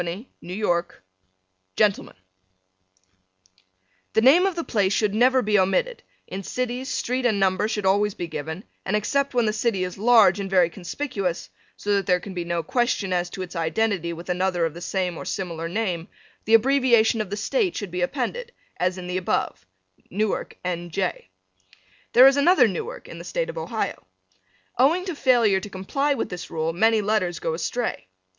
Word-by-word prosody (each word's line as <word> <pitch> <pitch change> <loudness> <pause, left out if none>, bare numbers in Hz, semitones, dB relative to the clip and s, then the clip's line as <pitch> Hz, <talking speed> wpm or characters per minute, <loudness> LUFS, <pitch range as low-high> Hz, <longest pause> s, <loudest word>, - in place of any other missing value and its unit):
New 175 +8 -5 0.3
York 175 - -1 0.7
Gentlemen: 205 -2 +1 2.0
The 220 - +3
name 315 +10 +6
of 380 - -2
the 335 - -2
place 200 -7 +1
should 210 -1 +1
never 255 +3 +4
be 210 -1 +3
omitted; 475 - 0 0.2
in 190 - -6
cities, 250 +5 -3
street 250 +1 -1
and 220 -5 +2
number 190 +2 +2
should 215 -3 -3
always 205 +1 +2
be 175 - -4
given, 160 +3 -6 0.2
and 195 - -1
except 275 +6 0
when 240 -2 +3
the 215 - +1
city 215 -3 0
is 180 0 -5
large 215 -4 +5
and 195 -1 -4
very 180 -3 +3
conspicuous, 195 - -4 0.3
so 205 - -1
that 200 -2 0
there 180 -1 +3
can 190 +2 -9
be 175 -1 -3
no 170 -1 -2
question 230 -2 0
as 175 0 0
to 185 - -5
its 180 0 -10
identity 170 +2 0
with 170 +1 -8
another 180 -1 0
of 160 - -3
the 170 - -10
same 180 -2 -2
or - - -6
similar 165 -3 -4
name, 180 -4 -2 0.4
the 225 - +5
abbreviation 235 -2 +4
of 210 - -5
the 205 - -4
State 370 - 0
should 200 -4 -5
be 180 +1 -3
appended, 290 - -2 0.3
as 180 +1 0
in 180 - -7
the 180 +1 -2
above, 95 - -2 0.4
Newark, 210 +2 -2
N. 175 -1 -3
J. 175 - -3 0.8
There 250 +2 +9
is 270 +1 +6
another 345 +6 +5
Newark 465 +2 -5
in - - -9
the - - -8
State - - -2
of - - -13
Ohio. - - -4 0.7
Owing 325 +8 +3
to 365 - -3
failure 235 -8 +3
to 205 - -8
comply 275 +10 -1
with - - -3
this 180 -2 -7
rule 160 +1 -2
many 220 +4 +3
letters 200 -5 0
go 165 - -2
astray. 205 - -3
200 Hz, 180 wpm, -24 LUFS, 180-245 Hz, 2.0 s, There